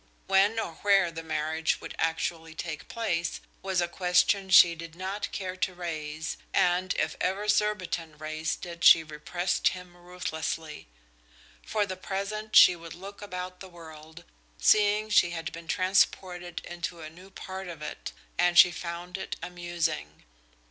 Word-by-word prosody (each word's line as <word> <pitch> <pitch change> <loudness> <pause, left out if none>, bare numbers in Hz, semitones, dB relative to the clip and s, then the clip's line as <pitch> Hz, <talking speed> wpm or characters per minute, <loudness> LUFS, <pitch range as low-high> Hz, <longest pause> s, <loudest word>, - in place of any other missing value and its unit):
When 195 +3 +3
or 170 -7 -4
where 195 -4 +4
the 165 0 -6
marriage 160 0 -1
would - - -8
actually 165 0 -2
take 160 -2 -6
place 175 -8 -2 0.2
was 190 -2 0
a 175 - 0
question 185 +2 +2
she 175 -1 +8
did 165 0 -9
not 190 +3 -4
care 185 -2 -4
to 185 0 -1
raise, 160 -2 -5 0.2
and 180 -1 +2
if - - -1
ever 195 +3 -1
Surbiton 185 -7 0
raised 155 +2 -3
it 170 0 -8
she 165 - +8
repressed 155 +4 -1
him 180 -1 -3
ruthlessly. 165 - -5 0.8
For 210 -2 0
the 185 -2 -6
present 200 +3 -4
she 180 - +9
would 165 -1 -10
look 200 +3 -10
about 180 -2 -6
the 190 - -10
world, 160 -2 -12 0.3
seeing 210 0 +3
she 175 - +5
had 165 - -5
been 165 0 -10
transported 180 -1 +1
into 175 -1 -5
a 155 - -7
new 180 +4 -15
part 190 0 -7
of 165 -3 -8
it, 150 - -6 0.3
and 175 0 +3
she 180 - +9
found 175 +2 -6
it - - -5
amusing. 170 - -3
175 Hz, 155 wpm, -28 LUFS, 165-190 Hz, 0.8 s, she